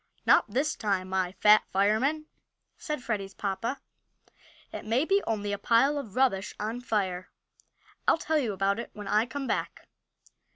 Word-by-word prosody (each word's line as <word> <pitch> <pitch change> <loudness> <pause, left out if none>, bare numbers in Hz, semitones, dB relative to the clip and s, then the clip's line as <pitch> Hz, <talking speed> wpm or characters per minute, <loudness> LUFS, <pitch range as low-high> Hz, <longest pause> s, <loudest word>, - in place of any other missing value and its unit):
"Not - - +5
this 275 +8 0
time, 195 -3 -1
my 185 -1 -1
Fat 210 +1 +6
Fireman!" 220 +11 +1 0.5
said 300 -4 -5
Freddie's 195 -4 -3
papa. 210 +7 -3 0.9
"It - - -6
may 235 +7 +1
be 395 +3 +3
only 205 -2 -1
a 200 - -3
pile 270 +6 +3
of 225 -8 -9
rubbish 245 -7 +1
on 225 +4 -3
fire. 190 -6 -2 0.8
I'll - - +5
tell 315 -1 0
you 240 -7 -1
about 195 +2 0
it 235 - -6
when 210 -1 -8
I 210 +4 +2
come 275 +1 -5
back." - - -3
215 Hz, 160 wpm, -28 LUFS, 195-265 Hz, 0.9 s, Fat